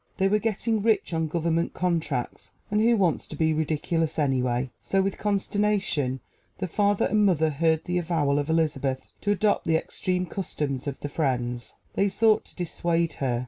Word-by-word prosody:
They 195 - +3
were 210 +2 +3
getting 220 0 0
rich 210 -4 +1
on 160 -1 0
government 165 +1 -1
contracts 160 -8 -2 0.2
and 210 0 +2
who 230 +1 +4
wants 180 -6 +1
to - - -8
be 160 +1 +2
ridiculous 160 +1 -1
anyway? 130 -3 0
So, 195 - 0
with 195 0 0
consternation, 200 -9 0 0.4
the 185 - -3
father 205 +3 +2
and 210 +1 +2
mother 160 -5 +3
heard 160 +2 +1
the 180 0 0
avowal 155 -5 +1
of 145 +2 -3
Elizabeth 145 -5 0
to 205 - -2
adopt 205 -1 +2
the 165 - +3
extreme 180 +2 -2
customs 150 -7 -3
of 140 - -4
the - - -3
Friends. 125 -5 -2 0.2
They 200 +1 +2
sought 215 +2 +3
to - - -16
dissuade 170 -1 -1
her. 125 -3 +1
165 Hz, 175 wpm, -26 LUFS, 145-195 Hz, 0.4 s, who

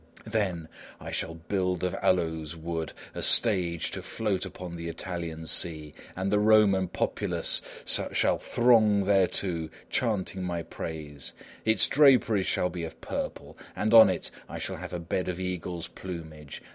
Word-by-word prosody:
Then, 100 -7 -2 0.3
I - - -8
shall 80 - -3
build 90 +1 -2
of 90 -1 0
aloes 80 -3 0
wood 80 -1 -4 0.2
a - - -5
stage 90 -7 +5
to - - -5
float 100 -4 -2
upon 90 -1 -8
the 85 0 -5
Italian 85 -1 -5
sea, 80 -3 -1 0.2
and 95 +1 -2
the 105 - +3
Roman 105 -3 +4
populace - - -1 0.2
shall - - +2
throng 110 -4 +3
thereto 95 -4 +1 0.2
chanting 100 -5 -1
my 85 -2 -3
praise. 75 -6 -7 0.3
Its 110 0 +4
draperies 125 - +4
shall 90 - 0
be 85 -1 -5
of 80 - -7
purple, - - -5 0.2
and 110 +2 0
on 115 -1 +9
it - - -3 0.2
I - - -6
shall - - -4
have - - -8
a 90 - -3
bed 85 +2 -3
of 90 -1 -3
eagles' 90 -2 -4
plumage. 80 -5 -9
90 Hz, 150 wpm, -28 LUFS, 85-100 Hz, 0.3 s, on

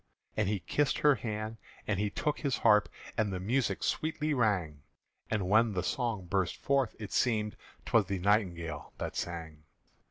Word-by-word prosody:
And 105 -2 +1
he 105 -3 -1
kissed 140 - +1
her 150 -1 +5
hand 110 -2 -4 0.3
and 105 0 -1
took 150 -1 0
his 140 -4 0
harp, 105 -2 +5 0.3
And 105 -2 +2
the 95 - -3
music 105 +1 0
sweetly 155 -1 0
rang; 95 - +1 0.5
And 105 -4 0
when 110 +2 +4
the 90 - -1
song 115 -7 -1
burst 90 -1 0
forth, 135 -4 +1
it 105 -2 -7
seemed 105 -4 +1 0.3
'T - - -8
was - - +6
the 100 - -1
nightingale 85 -6 0
that - - -4
sang. 80 -3 -5
105 Hz, 165 wpm, -31 LUFS, 95-120 Hz, 0.5 s, was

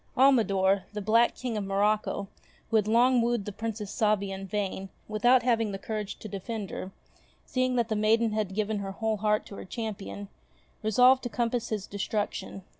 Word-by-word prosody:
Almidor, 200 -7 +4
the 210 - -3
black 230 +4 +3
King 245 -4 -3
of 210 - -2
Morocco, 200 +1 0 0.4
who - - +1
had 210 -1 +1
long 240 +3 +4
wooed 235 -3 0
the 210 - -4
Princess 210 0 -5
Sabia 210 -2 +1
in 195 0 -6
vain, 195 -1 -3 0.2
without 240 +4 +4
having 230 -3 +2
the 195 - -4
courage 210 0 -4
to - - -8
defend 200 +1 -5
her, 185 - -5 0.6
seeing 255 0 0
that 235 -2 +1
the 220 - -1
maiden 220 +2 +3
had 210 -3 -2
given 215 0 -1
her 195 -1 -5
whole 220 +1 -1
heart 210 +1 +1
to 200 - -10
her - - -7
champion, 205 -1 -5 0.5
resolved 250 +4 +5
to 245 - -4
compass 235 +1 -1
his 210 -3 -2
destruction. 205 -1 -3
215 Hz, 185 wpm, -28 LUFS, 200-230 Hz, 0.6 s, resolved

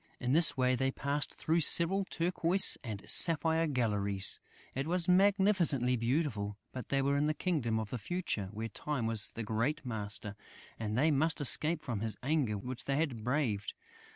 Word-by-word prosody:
In 125 +1 -1
this 160 -2 +4
way, 130 0 +2
they 135 +1 0
passed 140 +2 -3
through 165 +2 0
several 180 +5 +3
turquoise 175 +1 +2
and 110 -5 -7
sapphire 165 0 +2
galleries. 105 -7 +1 0.3
It 135 +3 -3
was 175 0 +1
magnificently 185 - +3
beautiful, 115 -5 -2
but 130 - -8
they 135 -1 +1
were 140 +1 +1
in 145 - +1
the 155 0 0
Kingdom 135 -13 -1
of 110 -2 -6
the 125 - -4
Future, 130 - -3
where 110 +1 -5
Time 145 -3 -3
was 115 -2 +1
the 115 - -5
great 120 +8 -2
master, 105 -2 -3 0.4
and 110 0 -3
they 155 +5 +3
must 155 +3 +1
escape 150 +3 +3
from 115 -6 -3
his 110 0 -4
anger 135 -7 0
which 125 +5 -5
they 140 - -1
had 140 -7 -2
braved. 120 -6 -2
135 Hz, 175 wpm, -32 LUFS, 115-160 Hz, 0.4 s, this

